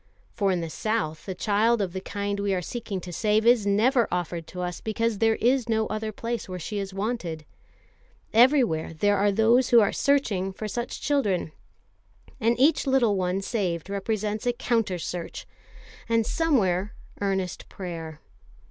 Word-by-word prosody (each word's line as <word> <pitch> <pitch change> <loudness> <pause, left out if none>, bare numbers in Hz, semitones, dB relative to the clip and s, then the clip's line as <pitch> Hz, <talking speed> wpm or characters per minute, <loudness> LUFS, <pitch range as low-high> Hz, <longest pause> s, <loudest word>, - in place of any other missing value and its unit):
For 200 -3 +1
in 180 -2 0
the 165 - -4
South 210 -8 -2
the 190 - -4
child 215 +5 +2
of 190 -4 -2
the 190 - -4
kind 200 +1 -3
we 200 -1 0
are 180 - -1
seeking 210 -1 -4
to 175 0 -8
save 215 +4 +1
is 235 -4 +4
never 230 +5 +3
offered 175 -2 -3
to 180 - -6
us 180 -1 -4
because 220 -1 -1
there 225 -1 +3
is 245 +1 +1
no 220 -1 +2
other 215 0 -3
place 230 -1 -4
where 185 - -4
she 200 +5 -4
is 195 -1 -4
wanted. 190 -6 -3 0.9
Everywhere 235 - +4
there 205 +5 +2
are 200 +1 +3
those 230 +5 +3
who 240 - +7
are 205 - +3
searching 210 -10 +1
for 215 +3 -5
such 240 +3 -4
children; 210 - 0 0.9
and 235 +2 +1
each 290 +2 +3
little 250 -6 +3
one 185 +1 -1
saved 190 -5 -2
represents 210 +2 -2
a 245 - +3
counter 225 -6 0
search, 175 0 -5 0.6
and 230 -1 +2
somewhere, 210 - +1 0.3
earnest 190 -2 -2
prayer. 165 -4 -7
205 Hz, 165 wpm, -26 LUFS, 185-230 Hz, 0.9 s, who